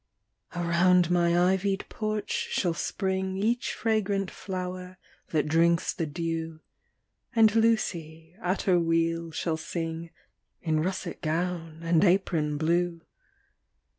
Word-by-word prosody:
Around 175 Hz, 0 st, +3 dB
my 175 Hz, 0 st, +3 dB
ivy'd 195 Hz, +1 st, -1 dB
porch 215 Hz, -1 st, -3 dB, 0.2 s
shall 175 Hz, -3 st, +1 dB
spring 190 Hz, +2 st, -2 dB
Each 235 Hz, +5 st, 0 dB
fragrant 205 Hz, -4 st, 0 dB
flower 185 Hz, -1 st, -6 dB, 0.3 s
that 155 Hz, -2 st, +1 dB
drinks 170 Hz, +2 st, +3 dB
the 165 Hz, -, -2 dB
dew; 165 Hz, 0 st, -3 dB, 0.8 s
And 220 Hz, -2 st, +6 dB
Lucy, 170 Hz, -8 st, 0 dB
at 185 Hz, +2 st, -1 dB
her 180 Hz, -2 st, +4 dB
wheel, 165 Hz, 0 st, +1 dB
shall 160 Hz, 0 st, -2 dB
sing 165 Hz, 0 st, -4 dB, 0.5 s
In 160 Hz, -2 st, +1 dB
russet 185 Hz, +1 st, -3 dB
gown 165 Hz, 0 st, -2 dB
and 165 Hz, +1 st, +3 dB
apron 170 Hz, -6 st, +2 dB
blue. 170 Hz, +2 st, 0 dB
175 Hz, 110 wpm, -28 LUFS, 165-190 Hz, 0.8 s, And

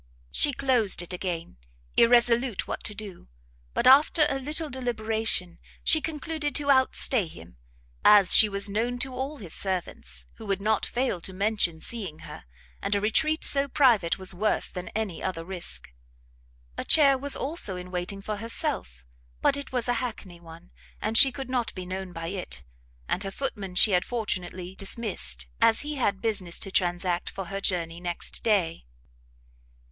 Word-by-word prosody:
She 290 Hz, -, +2 dB
closed 245 Hz, -9 st, +2 dB
it 175 Hz, -, -6 dB
again, 175 Hz, -, -5 dB, 0.4 s
irresolute 235 Hz, -1 st, +3 dB
what -, -, -5 dB
to 210 Hz, -, -1 dB
do: 200 Hz, -, -9 dB, 0.5 s
but -, -, 0 dB
after 290 Hz, +4 st, +6 dB
a 270 Hz, -, -2 dB
little 305 Hz, +4 st, -2 dB
deliberation, 225 Hz, -, -2 dB, 0.2 s
she 315 Hz, -, +4 dB
concluded 300 Hz, -1 st, -4 dB
to 285 Hz, -1 st, +2 dB
out 260 Hz, -1 st, +3 dB
stay 225 Hz, -9 st, +2 dB
him, 80 Hz, -, -14 dB, 0.5 s
as 200 Hz, -3 st, +7 dB
she 215 Hz, -, +8 dB
was 200 Hz, 0 st, +1 dB
known 230 Hz, +5 st, -1 dB
to 260 Hz, +1 st, -4 dB
all 275 Hz, +4 st, -4 dB
his 180 Hz, -, -6 dB
servants, 70 Hz, -, -2 dB
who 220 Hz, -, -10 dB
would 195 Hz, -1 st, 0 dB
not 215 Hz, +1 st, 0 dB
fail 245 Hz, -8 st, -2 dB
to 190 Hz, -, -8 dB
mention 195 Hz, -4 st, 0 dB
seeing 195 Hz, -10 st, -3 dB
her; -, -, -11 dB, 0.4 s
and 200 Hz, +1 st, 0 dB
a -, -, +2 dB
retreat 310 Hz, +10 st, +1 dB
so 280 Hz, 0 st, +3 dB
private 240 Hz, -, +3 dB
was 190 Hz, 0 st, -1 dB
worse 210 Hz, +4 st, 0 dB
than 180 Hz, -1 st, -7 dB
any 215 Hz, -6 st, -3 dB
other 180 Hz, -3 st, -3 dB
risk. 170 Hz, -, -4 dB, 0.9 s
A -, -, -2 dB
chair 280 Hz, -3 st, +6 dB
was 280 Hz, +2 st, +1 dB
also 270 Hz, -, -1 dB
in 180 Hz, 0 st, -8 dB
waiting 185 Hz, +2 st, -4 dB
for 215 Hz, 0 st, -4 dB
herself, 65 Hz, -, -1 dB, 0.3 s
but -, -, +3 dB
it 280 Hz, -1 st, -6 dB
was 250 Hz, -2 st, -1 dB
a 245 Hz, -, +2 dB
hackney 210 Hz, -8 st, -7 dB
one, 170 Hz, +1 st, -14 dB, 0.3 s
and 220 Hz, -, -3 dB
she 270 Hz, +3 st, +8 dB
could 270 Hz, -1 st, -7 dB
not 250 Hz, -3 st, -1 dB
be 185 Hz, -1 st, -6 dB
known 185 Hz, 0 st, -6 dB
by 165 Hz, -1 st, -6 dB
it; 175 Hz, -, -6 dB, 0.4 s
and 185 Hz, -, -1 dB
her 195 Hz, -, -3 dB
footman 195 Hz, -5 st, -5 dB
she 210 Hz, -, +6 dB
had 180 Hz, -1 st, +3 dB
fortunately 185 Hz, -5 st, -4 dB
dismissed, 190 Hz, -, -2 dB, 0.2 s
as 225 Hz, -, +4 dB
he 300 Hz, +1 st, -5 dB
had 200 Hz, -6 st, -1 dB
business 195 Hz, -6 st, -1 dB
to 195 Hz, -, -4 dB
transact 175 Hz, -1 st, 0 dB
for 195 Hz, -, -6 dB
her 195 Hz, -, -3 dB
journey 170 Hz, -3 st, -1 dB
next 175 Hz, -1 st, 0 dB
day. 180 Hz, -, 0 dB
205 Hz, 170 wpm, -26 LUFS, 180-250 Hz, 0.9 s, she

